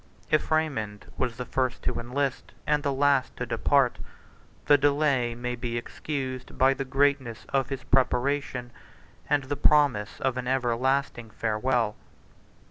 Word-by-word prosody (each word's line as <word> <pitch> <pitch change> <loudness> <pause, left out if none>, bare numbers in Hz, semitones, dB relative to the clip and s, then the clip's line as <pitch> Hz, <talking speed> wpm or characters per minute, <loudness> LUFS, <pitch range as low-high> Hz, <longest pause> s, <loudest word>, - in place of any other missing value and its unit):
If 155 - +2
Raymond 130 -10 -1
was 120 -3 -2
the 125 - -4
first 130 -1 -1
to - - -1
enlist 130 +3 -3
and 150 0 +2
the 145 -1 0
last 140 -1 +2
to 125 - -2
depart, 125 +2 +2 0.7
the 145 - +7
delay 140 -4 +2
may 125 +1 -3
be 120 -1 -3
excused 130 0 -5
by 135 +1 +5
the 135 0 -4
greatness 135 -3 0
of 135 -2 0
his 135 -1 -4
preparation 130 -1 0 0.6
and 145 -1 +2
the 140 +2 -3
promise 140 -10 +2
of 130 -1 0
an 125 -1 -3
everlasting 130 -1 0
farewell. 115 0 0
130 Hz, 140 wpm, -27 LUFS, 120-140 Hz, 0.7 s, the